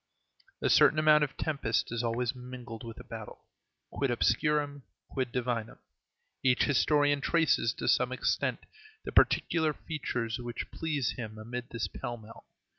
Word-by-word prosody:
A -, -, +3 dB
certain 155 Hz, -, +6 dB
amount 155 Hz, -1 st, +6 dB
of 140 Hz, -1 st, -3 dB
tempest 140 Hz, -9 st, -1 dB
is 115 Hz, 0 st, -1 dB
always 120 Hz, +2 st, 0 dB
mingled 125 Hz, -2 st, -9 dB
with 115 Hz, -1 st, -8 dB
a -, -, -9 dB
battle. -, -, -9 dB, 0.5 s
Quid 140 Hz, -, -1 dB
obscurum, 145 Hz, +4 st, +1 dB, 0.3 s
quid 130 Hz, -3 st, -2 dB
divinum. 120 Hz, -3 st, -2 dB, 0.6 s
Each 125 Hz, -1 st, +3 dB
historian 145 Hz, 0 st, +3 dB
traces, 160 Hz, -8 st, +2 dB
to -, -, -5 dB
some 125 Hz, 0 st, +3 dB
extent, 130 Hz, -, 0 dB, 0.4 s
the -, -, -4 dB
particular 160 Hz, -3 st, +3 dB
feature 135 Hz, -8 st, -3 dB
which 120 Hz, -1 st, -5 dB
pleases 150 Hz, -6 st, -1 dB
him 110 Hz, -3 st, -6 dB
amid 120 Hz, +3 st, -6 dB
this 115 Hz, -3 st, -2 dB
pell 120 Hz, +5 st, -5 dB
mell. 110 Hz, 0 st, -14 dB
125 Hz, 145 wpm, -30 LUFS, 115-145 Hz, 0.6 s, certain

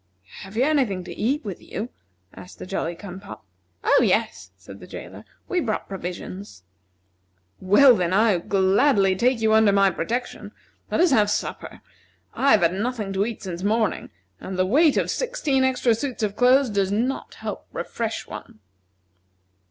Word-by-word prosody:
"Have 195 Hz, +3 st, -10 dB
you 250 Hz, -, +3 dB
any 295 Hz, -1 st, +3 dB
thing 195 Hz, -6 st, -4 dB
to -, -, -8 dB
eat 265 Hz, +4 st, -1 dB
with 195 Hz, -4 st, -6 dB
you?" 225 Hz, +4 st, -6 dB, 0.4 s
asked 180 Hz, -, -12 dB
the -, -, -8 dB
Jolly 175 Hz, -2 st, -3 dB
cum 190 Hz, 0 st, -9 dB
pop. 195 Hz, -, -11 dB, 0.4 s
"Oh, -, -, +4 dB
yes," 90 Hz, -, 0 dB
said 95 Hz, +2 st, -13 dB
the -, -, -12 dB
jailer, -, -, -10 dB, 0.2 s
"we 365 Hz, -, 0 dB
brought 225 Hz, -10 st, -2 dB
provisions." 180 Hz, -, -7 dB, 1.0 s
"Well, 235 Hz, +7 st, +6 dB
then, 180 Hz, -4 st, -1 dB
I 205 Hz, -1 st, +3 dB
gladly 195 Hz, +2 st, +2 dB
take 240 Hz, +3 st, +1 dB
you 220 Hz, 0 st, +3 dB
under 220 Hz, -2 st, +5 dB
my 195 Hz, -1 st, +4 dB
protection. 235 Hz, +9 st, -4 dB, 0.4 s
Let -, -, +1 dB
us 355 Hz, -3 st, +4 dB
have 210 Hz, -6 st, +4 dB
supper. -, -, -4 dB, 0.5 s
I 275 Hz, -, +1 dB
have 215 Hz, -, +4 dB
had 170 Hz, +1 st, +3 dB
nothing 210 Hz, -1 st, -3 dB
to 195 Hz, +2 st, 0 dB
eat 230 Hz, -4 st, -7 dB
since 180 Hz, -2 st, -6 dB
morning, 215 Hz, +1 st, 0 dB, 0.3 s
and 190 Hz, -1 st, -6 dB
the 185 Hz, -, +2 dB
weight 290 Hz, -, +3 dB
of -, -, 0 dB
sixteen 340 Hz, -, 0 dB
extra 255 Hz, -2 st, +2 dB
suits 240 Hz, 0 st, -4 dB
of 205 Hz, -1 st, -1 dB
clothes 250 Hz, 0 st, +4 dB
does 200 Hz, -1 st, 0 dB
not 240 Hz, +6 st, -2 dB
help -, -, -7 dB
to -, -, -10 dB
refresh 230 Hz, -1 st, -4 dB
one." -, -, -10 dB
210 Hz, 175 wpm, -23 LUFS, 190-250 Hz, 1.0 s, Well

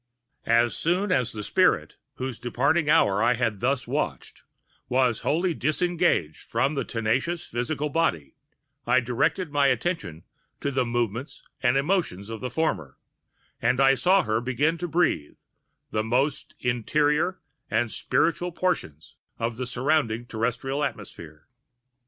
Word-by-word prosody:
As 115 Hz, +1 st, +3 dB
soon 185 Hz, +4 st, 0 dB
as 125 Hz, -9 st, +2 dB
the 105 Hz, -1 st, -5 dB
spirit, -, -, +2 dB, 0.2 s
whose 130 Hz, -2 st, -5 dB
departing 140 Hz, +6 st, +1 dB
hour 105 Hz, -11 st, +4 dB
I 120 Hz, +2 st, +3 dB, 0.2 s
thus 125 Hz, +6 st, -1 dB
watched, -, -, -3 dB, 0.5 s
was 125 Hz, -3 st, +2 dB
wholly 170 Hz, +4 st, +1 dB
disengaged 160 Hz, -, 0 dB
from 130 Hz, +6 st, 0 dB
the 140 Hz, -, -1 dB
tenacious 130 Hz, +9 st, -1 dB
physical 140 Hz, +6 st, -2 dB
body, 110 Hz, -, 0 dB, 0.5 s
I 130 Hz, -, +5 dB
directed 150 Hz, +8 st, 0 dB
my 145 Hz, -1 st, +3 dB
attention 130 Hz, -, -1 dB, 0.4 s
to 140 Hz, -, -1 dB
the 130 Hz, -2 st, +1 dB
movements[Pg 120 Hz, -3 st, 0 dB, 0.5 s
199] 125 Hz, -, +3 dB
and 130 Hz, -, +3 dB
emotions 140 Hz, -, 0 dB
of 110 Hz, -, -6 dB
the 125 Hz, -, -3 dB
former; 100 Hz, -, -2 dB, 0.6 s
and 125 Hz, +3 st, +2 dB
I 135 Hz, 0 st, +6 dB
saw 180 Hz, +10 st, +3 dB
her 110 Hz, 0 st, 0 dB
begin 145 Hz, +7 st, 0 dB
to 175 Hz, -, -2 dB
breathe 160 Hz, -, 0 dB, 0.5 s
the 110 Hz, -, 0 dB
most 130 Hz, +6 st, -1 dB
interior 150 Hz, -, +1 dB, 0.3 s
or 120 Hz, -, +1 dB
spiritual 175 Hz, +9 st, 0 dB
portions 165 Hz, -, -3 dB, 0.2 s
of 115 Hz, 0 st, -2 dB
the 125 Hz, 0 st, -3 dB
surrounding 125 Hz, -3 st, 0 dB
terrestrial 125 Hz, +5 st, -2 dB
atmosphere. 85 Hz, -, -7 dB
130 Hz, 135 wpm, -26 LUFS, 115-155 Hz, 0.6 s, I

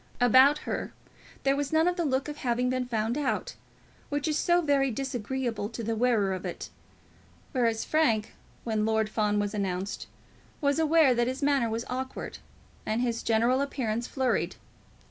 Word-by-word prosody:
About 260 Hz, +4 st, +6 dB
her -, -, -3 dB, 0.5 s
there 275 Hz, 0 st, +3 dB
was 285 Hz, -1 st, -2 dB
none 320 Hz, +2 st, +3 dB
of 360 Hz, -, +1 dB
the 345 Hz, -2 st, -1 dB
look 270 Hz, 0 st, 0 dB
of 295 Hz, 0 st, -6 dB
having 250 Hz, -1 st, 0 dB
been 255 Hz, -1 st, -1 dB
found 230 Hz, +3 st, -1 dB
out, 295 Hz, -, -1 dB, 0.6 s
which 290 Hz, +1 st, -1 dB
is 305 Hz, -, +1 dB
so 345 Hz, +3 st, +3 dB
very 285 Hz, -4 st, +2 dB
disagreeable 245 Hz, -3 st, -3 dB
to 230 Hz, 0 st, -6 dB
the 225 Hz, +1 st, -1 dB
wearer 220 Hz, -5 st, +2 dB
of 185 Hz, -, -5 dB
it; -, -, -6 dB, 0.8 s
whereas 230 Hz, -4 st, +1 dB
Frank, 230 Hz, -9 st, +1 dB, 0.3 s
when 220 Hz, -2 st, 0 dB
Lord 220 Hz, 0 st, +1 dB
Fawn 210 Hz, -1 st, +1 dB
was 205 Hz, -1 st, -1 dB
announced, 195 Hz, -1 st, -3 dB, 0.5 s
was 285 Hz, +1 st, +1 dB
aware 315 Hz, -4 st, +5 dB
that 240 Hz, 0 st, +1 dB
his 260 Hz, +3 st, -3 dB
manner 280 Hz, -5 st, +2 dB
was 225 Hz, +1 st, -3 dB
awkward, 260 Hz, +1 st, -5 dB, 0.4 s
and 220 Hz, +2 st, -1 dB
his 235 Hz, -2 st, -1 dB
general 235 Hz, +4 st, +2 dB
appearance 240 Hz, -5 st, -2 dB
flurried. 260 Hz, -2 st, 0 dB
250 Hz, 165 wpm, -28 LUFS, 220-280 Hz, 0.8 s, About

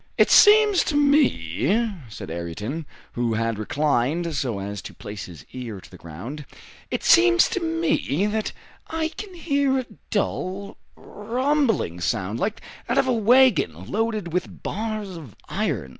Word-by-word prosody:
"It -, -, +4 dB
seems 420 Hz, -2 st, +7 dB
to 300 Hz, -, -1 dB
me," 235 Hz, -, +2 dB, 0.2 s
said 95 Hz, -, -8 dB
Ayrton, 105 Hz, -, -5 dB, 0.2 s
who 120 Hz, -2 st, -1 dB
had 115 Hz, -1 st, -1 dB
reclined 145 Hz, +6 st, 0 dB
so 125 Hz, -7 st, -1 dB
as 100 Hz, 0 st, -5 dB
to -, -, -10 dB
place 105 Hz, 0 st, -7 dB
his 85 Hz, -3 st, -12 dB
ear 120 Hz, -6 st, -6 dB
to -, -, -16 dB
the -, -, -12 dB
ground, 90 Hz, -, -8 dB, 0.5 s
"it -, -, -3 dB
seems 115 Hz, 0 st, +6 dB
to -, -, -1 dB
me 325 Hz, -, 0 dB
that 215 Hz, +1 st, -1 dB, 0.4 s
I 320 Hz, 0 st, -2 dB
can 385 Hz, +2 st, -9 dB
hear 280 Hz, -5 st, +1 dB
a 260 Hz, -, -2 dB, 0.2 s
dull, 200 Hz, -1 st, -2 dB, 0.2 s
rumbling 230 Hz, -, -1 dB
sound, 100 Hz, +3 st, -1 dB
like 210 Hz, +2 st, -2 dB, 0.2 s
that -, -, 0 dB
of -, -, +4 dB
a 255 Hz, -, +2 dB
wagon 220 Hz, -, +3 dB
loaded 215 Hz, -6 st, -1 dB
with 180 Hz, 0 st, -3 dB
bars 215 Hz, -3 st, -4 dB
of 140 Hz, -11 st, -11 dB
iron." 65 Hz, -, -2 dB
180 Hz, 150 wpm, -24 LUFS, -, 0.5 s, seems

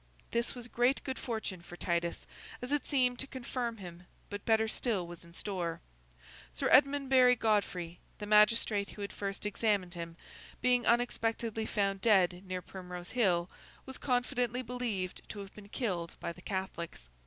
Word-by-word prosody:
This 235 Hz, +2 st, 0 dB
was 245 Hz, -1 st, -7 dB
great 245 Hz, +2 st, +2 dB
good 260 Hz, -, -4 dB
fortune 220 Hz, -6 st, -3 dB
for 175 Hz, 0 st, -11 dB
Titus, 170 Hz, -1 st, -1 dB, 0.3 s
as 250 Hz, +2 st, -5 dB
it 290 Hz, -2 st, +1 dB
seemed 250 Hz, -3 st, +3 dB
to 270 Hz, -, -2 dB
confirm 240 Hz, -3 st, -3 dB
him; 180 Hz, -2 st, -10 dB, 0.2 s
but 205 Hz, 0 st, -5 dB
better 220 Hz, -1 st, +4 dB
still 215 Hz, -4 st, 0 dB
was 170 Hz, 0 st, -10 dB
in 170 Hz, -, -15 dB
store. 170 Hz, -2 st, -3 dB, 0.7 s
Sir -, -, 0 dB
Edmundbury 265 Hz, -2 st, +6 dB
Godfrey, 195 Hz, -7 st, 0 dB, 0.2 s
the 210 Hz, -, -5 dB
magistrate 210 Hz, -1 st, +4 dB
who 205 Hz, -, -7 dB
had 200 Hz, -, -5 dB
first 200 Hz, 0 st, -4 dB
examined 205 Hz, -3 st, +1 dB
him, 170 Hz, -1 st, -6 dB, 0.4 s
being 250 Hz, -1 st, +3 dB
unexpectedly 230 Hz, -2 st, +1 dB
found 195 Hz, -2 st, 0 dB
dead 185 Hz, -5 st, +4 dB
near 185 Hz, -1 st, -3 dB
Primrose 180 Hz, -2 st, -8 dB
Hill, 180 Hz, -8 st, +3 dB, 0.4 s
was 265 Hz, -1 st, -7 dB
confidently 250 Hz, -1 st, 0 dB
believed 225 Hz, -7 st, -3 dB
to -, -, -7 dB
have 195 Hz, 0 st, -10 dB
been 205 Hz, -1 st, -12 dB
killed 180 Hz, -9 st, -2 dB
by 170 Hz, -, -3 dB
the 180 Hz, -, -14 dB
Catholics. 175 Hz, -, -4 dB
210 Hz, 160 wpm, -33 LUFS, 180-245 Hz, 0.7 s, Edmundbury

